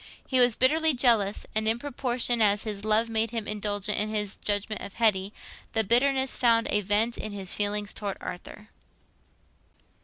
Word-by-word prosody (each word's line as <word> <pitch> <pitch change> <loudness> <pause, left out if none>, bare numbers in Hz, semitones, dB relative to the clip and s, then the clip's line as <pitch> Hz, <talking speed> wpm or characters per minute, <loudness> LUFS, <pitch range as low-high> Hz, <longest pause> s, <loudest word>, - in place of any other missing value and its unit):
He 260 - +1
was 245 -2 +5
bitterly 315 +3 +3
jealous, 230 -5 +2
and 220 0 0
in 225 +1 +2
proportion 245 -3 -1
as 205 -1 +3
his 210 -3 -5
love 215 +2 +2
made 225 0 -1
him 225 -2 -4
indulgent 210 -1 -2
in 210 +1 -1
his 210 -2 -2
judgment 205 +1 -3
of 200 - -8
Hetty, 205 -4 +1 0.4
the 220 - +2
bitterness 265 +4 +2
found 230 -2 +3
a 210 - +2
vent 210 +4 0
in 215 - -5
his 195 -2 -5
feeling 205 0 0
towards 200 -1 -5
Arthur. 210 +4 -9
215 Hz, 165 wpm, -26 LUFS, 205-240 Hz, 0.4 s, was